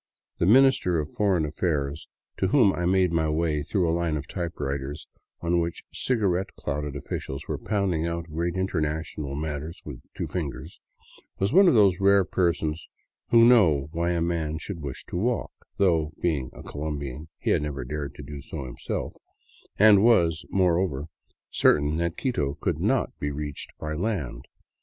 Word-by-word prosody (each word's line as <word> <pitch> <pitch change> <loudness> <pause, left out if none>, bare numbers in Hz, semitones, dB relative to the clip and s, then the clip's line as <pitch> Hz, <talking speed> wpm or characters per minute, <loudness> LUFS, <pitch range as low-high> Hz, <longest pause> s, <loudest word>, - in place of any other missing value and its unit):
The 85 - +2
Minister 125 -7 +5
of 75 0 -4
Foreign 95 -6 +2
Affairs 75 -1 -2 0.3
to 95 - +1
whom 105 -2 +4
I 85 0 -1
made 95 -1 +3
my 80 -2 +1
way 75 -1 0
through 90 +4 0
a 80 - +1
line 85 -2 0
of 70 0 -6
typewriters 70 -5 -4 0.4
on 85 0 +1
which 85 0 -3
cigarette 95 -7 0
clouded 75 -1 -4
officials 70 0 -5
were - - -3
pounding 95 -6 0
out 85 0 -2
great 85 +2 -3
international 80 -5 -2
matters 75 +3 -4
with 65 -5 -8 0.2
two - - -2
fingers, 75 -2 -5 0.6
was 100 +5 0
one 195 +2 +7
of 170 - +5
those 100 -5 +5
rare 100 -1 +5
persons 85 -3 -1 0.4
who 115 -1 +7
know 80 - +5
why 85 +1 0
a 85 -1 0
man 80 -2 -1
should 85 +2 -6
wish 70 -3 -6
to - - -5
walk, 120 +6 -1 0.3
though, 80 -5 +2
being 75 -7 0
a - - -12
Colombian, 75 0 -5
he - - -1
had - - +3
never 70 -3 -4
dared 70 +2 -5
do 70 0 -7
so 65 0 -7
himself, - - -4 0.6
and 105 -1 +7
was, 85 -8 +4
moreover, 85 -5 +1 0.4
certain 75 +1 +3
that 85 0 -1
Quito 75 - -1
could - - -2
not - - +1
be 75 - -1
reached 75 0 -5
by 75 0 -4
land. 75 - -3
80 Hz, 165 wpm, -26 LUFS, 75-95 Hz, 0.6 s, one